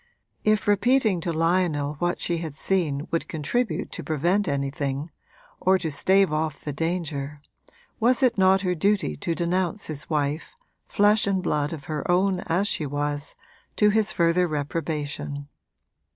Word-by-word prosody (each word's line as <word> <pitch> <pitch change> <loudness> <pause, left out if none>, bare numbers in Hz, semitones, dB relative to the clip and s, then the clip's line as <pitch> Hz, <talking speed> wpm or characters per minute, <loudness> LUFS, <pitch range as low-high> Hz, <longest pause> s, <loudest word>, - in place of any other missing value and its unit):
If 215 -1 +2
repeating 205 -2 +3
to 170 0 -2
Lionel 165 -3 +1
what 175 0 0
she 170 -1 -1
had 160 -4 -6
seen 155 -5 0
would 165 - -1
contribute 220 +10 -2
to - - -5
prevent 175 +6 +1
anything, 140 +1 -2 0.5
or 190 +1 +4
to 160 -4 -3
stave 190 +3 +3
off 155 -1 -1
the 145 - -5
danger, 155 -3 -3 0.6
was 245 +3 +3
it 245 -2 +4
not 190 0 +4
her 180 -2 0
duty 195 - +1
to 165 - -2
denounce 180 +3 -1
his 155 -1 -5
wife, 150 0 -2 0.3
flesh 205 +1 +4
and 190 -2 0
blood 150 -4 0
of 155 -4 -7
her 155 0 -4
own 185 +1 +2
as 180 +5 +1
she 155 - -1
was, 145 +1 -3 0.4
to 210 -1 +4
his 215 0 +2
further 170 -1 +2
reprobation? 145 -1 -3
165 Hz, 150 wpm, -25 LUFS, 150-190 Hz, 0.6 s, or